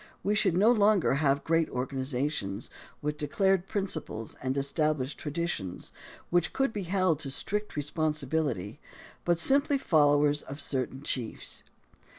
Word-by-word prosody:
We 205 - +1
should 200 -5 +2
no 215 +5 +6
longer 210 - +4
have 140 0 +2
great 165 0 +2
organizations, 130 -4 -3 0.3
with 150 0 -2
declared 190 +5 +1
principles 160 - -3
and 130 +1 -1
es 140 0 +2
tabUshed 150 -4 0
traditions, 150 - -3 0.4
which 175 -1 +2
could 270 -4 +1
be 205 - -3
held 185 -5 +2
to 145 -4 -2
strict 210 +9 -1
responsibility, 150 - -1 0.5
but 175 -1 +3
simply 280 - +3
followers 145 - +3
of 140 +2 -8
certain 135 -1 -2
chiefs. 125 -5 -3
150 Hz, 135 wpm, -29 LUFS, 135-185 Hz, 0.5 s, no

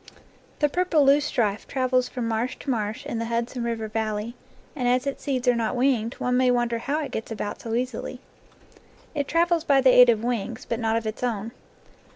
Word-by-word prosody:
The 295 - +3
purple 335 -2 +2
loosestrife 270 -7 +2
travels 255 -1 +1
from 245 -3 -3
marsh 230 +3 -1
to 275 - -2
marsh 215 -2 -3
in 230 - -3
the 230 - -2
Hudson 235 +1 -2
River 230 -2 -2
Valley, 215 +1 -2 0.4
and 250 -4 -1
as 250 +2 +2
its 275 - -3
seeds 260 -3 -2
are 245 - +6
not 230 +1 -1
winged, 245 -3 +1
one 250 0 -1
may 255 0 +3
wonder 240 -1 +1
how 290 +6 -1
it 275 - -6
gets 220 - -4
about 210 -2 -4
so 225 -1 -3
easily. 250 0 -3 0.9
It 285 -2 -2
travels 340 -1 +2
by 280 -4 +4
the 260 -1 +6
aid 250 -1 +8
of 225 -1 +2
wings, 240 -1 -3
but 230 - -2
not 225 -1 0
of 230 - -3
its 215 0 -4
own. 230 -3 -2
245 Hz, 200 wpm, -25 LUFS, 225-265 Hz, 0.9 s, aid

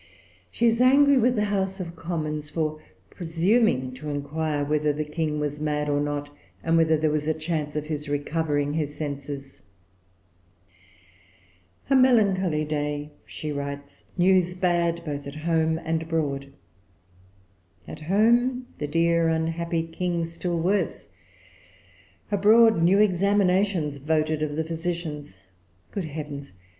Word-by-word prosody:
She 235 - -1
is 230 +1 +3
angry 275 +2 +6
with 245 +1 +3
the 210 - +1
House 195 -1 -1
of 170 -2 -6
Commons 155 -3 -4
for 155 -1 -2 0.3
presuming 170 - +1
to 150 +4 -7
inquire 145 +1 -2
whether 150 0 +1
the 150 +1 -3
King 150 0 -2
was 150 0 -3
mad 150 -1 -1
or 145 0 +1
not, 145 0 -3 0.3
and 165 0 +2
whether 160 -1 +4
there 155 0 +1
was 150 0 -1
a 160 - +1
chance 155 -2 -3
of 150 0 -2
his 150 -1 -4
recovering 145 0 -1
his 150 -2 -2
senses. 140 -2 -6 2.3
"A 275 - +3
melancholy 195 -11 +3
day," 150 0 -3 0.2
she 155 - -5
writes; 140 0 -6
"news 180 -1 +3
bad 170 -2 0
both 145 -2 -4
at 140 - -8
home 160 0 +1
and 160 0 0
abroad. 145 -4 -2 1.4
At - - -8
home 235 +9 +2
the 150 - -2
dear 165 +2 +2
unhappy 165 +1 -1
King 170 +1 -2
still 170 +1 -3
worse; 185 +5 -1 1.2
abroad 215 -1 +5
new 180 +4 +5
examinations 190 -5 +2
voted 155 +1 0
of 150 -1 -2
the 160 - 0
physicians. 160 - -4 0.5
Good 195 -4 -3
heavens! 145 -3 -7
160 Hz, 130 wpm, -25 LUFS, 150-180 Hz, 2.3 s, angry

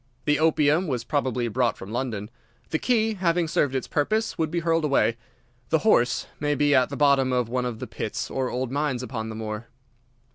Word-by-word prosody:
The 150 -1 +2
opium 155 +2 +3
was 125 -5 -2
probably 125 -3 -1
brought 120 0 0
from 95 - -9
London. 115 -3 -3 0.4
The 160 - +1
key, 225 -3 +2
having 175 -3 +1
served 140 -3 +1
its 130 - -2
purpose, 215 +9 0
would 160 -1 -1
be 170 +1 -1
hurled 165 0 +1
away. 140 -5 +2 0.5
The 160 - +4
horse 125 - +3
may 145 0 0
be 145 +1 +3
at 130 -2 +4
the 140 - -5
bottom 140 -2 +4
of 125 -2 0
one 125 +1 -1
of 120 -3 -3
the - - -5
pits - - -4
or 130 -1 -1
old 125 0 -3
mines 140 -3 -1
upon 110 -3 -4
the 110 - -6
moor." 110 +1 -5
135 Hz, 205 wpm, -25 LUFS, 120-155 Hz, 0.5 s, The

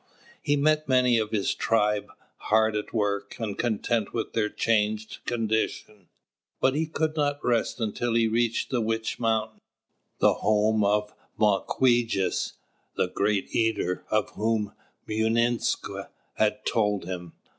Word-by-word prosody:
He 145 - +1
met 155 +1 +2
many 125 -2 +4
of 110 -1 -1
his 105 -3 0
tribe, 105 -2 +1 0.3
hard 110 0 +2
at 105 - -3
work, 100 -2 -1
and 105 -4 -3
content 115 -1 -1
with - - -3
their 105 -2 +1
changed 110 -1 0
condition; 110 -4 -2 0.5
but 130 - +3
he 155 +2 0
could 160 0 -1
not 145 -2 +1
rest 120 0 +1
until 115 +1 -1
he 115 -1 +4
reached 115 +1 0
the 125 -3 +1
Witch 115 0 -2
Mountain, 110 -1 0 0.6
the - - +4
home 110 0 +2
of 105 +1 +1 0.2
Mawquejess, 110 0 +1 0.4
the 90 - 0
Great 100 +1 -1
Eater, 110 -5 0
of 110 -1 +1
whom 110 -1 -1 0.3
Mūinsq' 115 +2 0 0.2
had - - 0
told 105 -4 +1
him. 90 -2 -6
110 Hz, 135 wpm, -26 LUFS, 105-120 Hz, 0.6 s, many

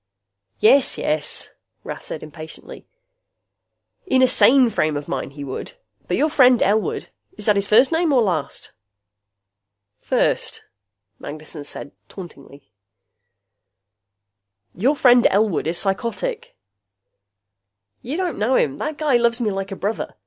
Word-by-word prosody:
"Yes, 265 +5 +4
yes," 150 -1 -3 0.3
Rath - - -8
said - - -7
impatiently, 155 +1 -11 1.2
"in 260 -6 +3
a - - +6
sane 255 -1 +5
frame 155 -7 0
of 145 - -7
mind, - - -4
he 145 0 -8
would. 140 - -7 0.3
But - - -1
your 305 +1 +1
friend 255 -5 +5
Elwood 210 +2 0 0.3
is - - -7
that 210 - +3
his 200 0 0
first 245 +7 +5
name 325 -1 +1
or 255 -4 +4
last?" 175 -8 -3 1.3
"First," - - 0 0.6
Magnessen 150 0 -8
said 145 - -8 0.2
tauntingly. 145 -6 -13 2.0
"Your 260 +11 +1
friend 245 -4 +5
Elwood 200 -5 +1
is 170 +1 -1
psychotic." 235 - -3 1.5
"You 275 +7 -5
don't 365 - -3
know 235 +5 +1
him. 140 - 0
That 305 0 -4
guy 295 -5 +2
loves 235 0 +1
me 220 -4 0
like 195 0 -5
a - - -4
brother. 205 +4 -4
215 Hz, 130 wpm, -21 LUFS, 160-260 Hz, 2.0 s, a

